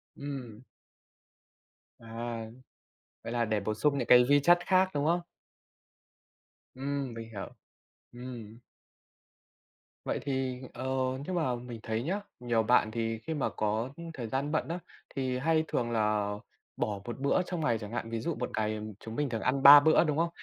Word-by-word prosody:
Ừm. 130 -6 -7 1.4
À. 115 0 -5 0.8
Vậy 115 - -5
là 120 -1 +1
để 110 -1 0
bổ 105 +2 -2
sung 140 +6 +1
những - - -2
cái 125 0 +8
vi 145 0 +6
chất 175 +2 +6
khác, 185 0 +4
đúng 145 0 0
không? 170 +2 +2 1.5
Ừm. 135 -1 -3
Mình 115 0 -8
hiểu. 100 -4 -6 0.7
Ừm. 120 -3 -9 1.5
Vậy - - -1
thì 130 -2 -2
ờ, 130 - -6 0.4
nhưng 185 - -3
mà 155 -8 +1
mình 120 -1 -8
thấy 110 +1 -2
nhá, 190 +8 -1 0.2
nhiều 120 -2 +1
bạn 110 -1 +3
thì 115 0 -2
khi 160 - -1
mà 150 - 0
có 110 +3 -1 0.2
thời 125 -6 -5
gian 135 +5 -2
bận 155 - 0
á, 170 +2 -3 0.4
thì 130 -2 -1
hay 160 +4 +2
thường 120 -1 -1
là 105 -2 +1 0.5
bỏ 105 -2 -1
một 120 +2 -6
bữa 140 +6 +2
trong 175 -1 -4
ngày 120 -7 +2
chẳng 105 -1 -8
hạn. 115 -1 -3
Ví 115 0 -2
dụ 165 +8 -2
một 125 - -3
ngày 110 0 0 0.2
chúng 110 0 -8
mình 145 +1 0
thường 115 -2 -3
ăn 135 +1 0
3 145 +1 +12
bữa, 155 +3 +5
đúng 150 -3 0
không? 165 +1 +2
125 Hz, 175 wpm, -30 LUFS, 115-145 Hz, 1.5 s, 3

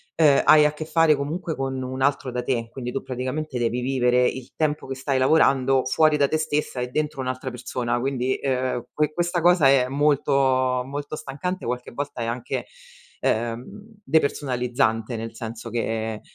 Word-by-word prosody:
ehm, 150 -4 +5
hai 150 -1 +7
a 150 - +2
che 155 +1 -6
fare 160 -2 +4
comunque 160 +4 -3
con 135 -1 -3
un 130 +1 -5
altro 135 -2 +1
da 125 - -2
te, 120 -3 -1
quindi 125 -2 -5
tu 135 - -4
praticamente 130 +2 -4
devi 120 +1 0
vivere 125 -1 +2
il 130 -2 -6
tempo 150 -3 -1
che 135 - -4
stai 135 0 -1
lavorando 135 -2 +3
fuori 155 +3 +3
da 140 -1 +3
te 155 - 0
stessa 150 -4 -2
e 125 - -2
dentro 150 +2 -2
un'altra 130 0 -4
persona. 120 0 -2
Quindi 130 0 -1
ehm 130 -2 -2
que 150 0 0
questa 175 +1 0
cosa 175 -4 +5
è 135 -2 +4
molto 145 +1 +1 0.5
molto 145 +3 -5
stancante, 155 +5 -5
qualche 125 +1 -4
volta 140 -1 -5
è - - -2
anche, 115 +1 -3 0.5
ehm, 115 +1 0 0.4
depersonalizzante, 125 - 0
nel 115 0 -6
senso 115 +1 -7
che, 110 -1 -2
130 Hz, 175 wpm, -24 LUFS, 125-150 Hz, 0.5 s, hai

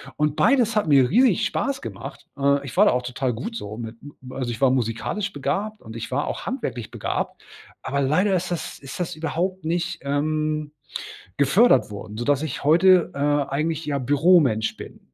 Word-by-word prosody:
Und 150 0 0
beides 235 -2 +3
hat 210 - +1
mir 135 -4 +5
riesig 240 0 +4
Spaß 275 -1 -2
gemacht. - - -8
Äh, 140 0 +2
ich 135 - -8
war - - +7
da - - +5
auch 125 - +1
total 125 0 -2
gut 225 - -5
so 105 +1 -7
mit 115 -1 -7
m 145 0 -12 0.2
also 130 -2 -3
ich 115 -1 -5
war 135 -2 +5
musikalisch 130 - -2
begabt 195 +10 -3
und 110 - -10
ich 115 - -6
war 140 +3 -1
auch - - -4
handwerklich 130 - -4
begabt. - - -4 0.4
Aber 140 - -2
leider 170 +9 +2
ist 180 0 -2
das 175 -2 -4
ist 135 -1 -8
das 175 -4 -3
überhaupt 175 +3 -2
nicht, 170 +1 -1
ähm, 155 +1 -1 0.7
gefördert 155 - +4
worden, 105 +1 -8
sodass 140 +4 +1
ich 155 -5 -4
heute, 175 +4 +5
äh, - - -5
eigentlich, 145 +2 0
ja, 145 -1 -1
Büromensch 140 -4 +3
bin. - - -10
145 Hz, 185 wpm, -23 LUFS, 130-175 Hz, 0.7 s, war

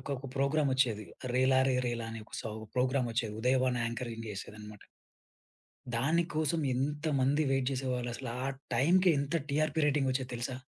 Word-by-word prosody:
ఒకోక 135 0 -4
programme 140 +1 +2
ఒచ్చేది 115 -6 +1 0.3
'రేలారే 130 0 +4
రేలా' 115 -1 -2
అనే 115 - -6
ఒక - - -12
సౌ 110 -2 -5 0.2
ప్రోగ్రామ్ 130 0 +2
ఒచ్చేది. 115 -2 -1
ఉదయభాను 130 0 +2
యాంకరింగ్ 115 -1 -5
జేసేదన్నమాట. 105 +1 -8 1.1
దాని 155 +9 +2
కోసం 155 +1 +1
ఎంత 145 +4 -1
మంది 140 +4 +3
వెయిట్ 135 -1 +2
జేసేవాళ్ళు, 125 -2 -2
అసలు 115 - -5
ఆ 135 - 0 0.3
టైంకి 180 +9 +4
ఎంత 140 +4 0
టీఆర్‌పీ 155 +2 +1
రేటింగ్ 140 -2 +2
ఒచ్చేది 130 0 -2
తెలుసా? 120 +2 -3
130 Hz, 150 wpm, -31 LUFS, 120-140 Hz, 1.1 s, రేలారే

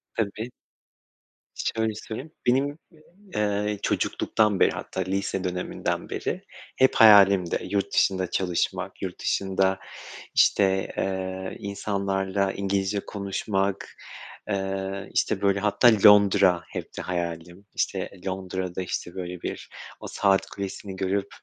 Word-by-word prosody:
Tabii. 110 +1 -2 1.1
Şöyle 110 -1 -1
söyleyeyim. 115 +8 -7 0.2
Benim, 140 +4 +2 0.6
ııı, 105 0 0
çocukluktan 105 -3 +1
beri, - - +5
hatta 95 - -5
lise 95 0 -2
döneminden 90 -1 -3
beri - - -3 0.4
hep 130 0 +4
hayalimdi. 100 -5 +7
Yurt 100 -1 -1
dışında 95 -2 +2
çalışmak, 90 -3 -1
yurt - - -5
dışında 95 0 +1 0.6
işte, 95 -1 +3
ııı, 95 0 -3
insanlarla 100 -1 -1
İngilizce 100 0 -1
konuşmak, 100 -1 -2 0.6
ııı, 95 0 -3
işte 95 - +1
böyle 100 0 +2
hatta 105 +4 +4 0.2
Londra 100 -3 +6
hepti - - -6
hayalim. 85 +1 -4
İşte - - -1 0.2
Londra'da 95 -1 -3
işte 85 -1 -4
böyle 90 -1 -6
bir - - -6 0.3
o - - -8
saat 95 -1 +2
kulesini 100 0 -6
görüp, 95 +1 -1
95 Hz, 110 wpm, -26 LUFS, 95-100 Hz, 1.1 s, hayalimdi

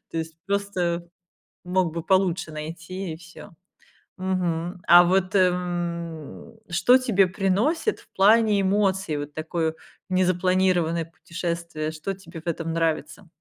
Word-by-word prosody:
То 165 - -3
есть 160 0 -5
просто 180 -4 -1 0.6
мог 180 -2 +1
бы 165 -1 -4
получше 190 -2 +1
найти 170 +3 -6
и - - -9
всё. 170 0 -13 0.7
Мгм. 180 -1 -2
А 175 0 +9
вот, 185 +2 +1
м, 175 -1 -1
что 190 +9 +5
тебе 210 -7 +3
приносит 210 - 0
в - - -21
плане 210 +1 +5
эмоций, 195 -4 +1
вот 145 0 -6
такое 160 0 -2 0.3
незапланированное 185 -2 +2
путешествие? 170 -2 -4
Что 160 +5 -4
тебе 170 -4 -11
в 175 - -16
этом 165 0 -2
нравится? 165 +2 -2
175 Hz, 125 wpm, -24 LUFS, 165-190 Hz, 0.7 s, А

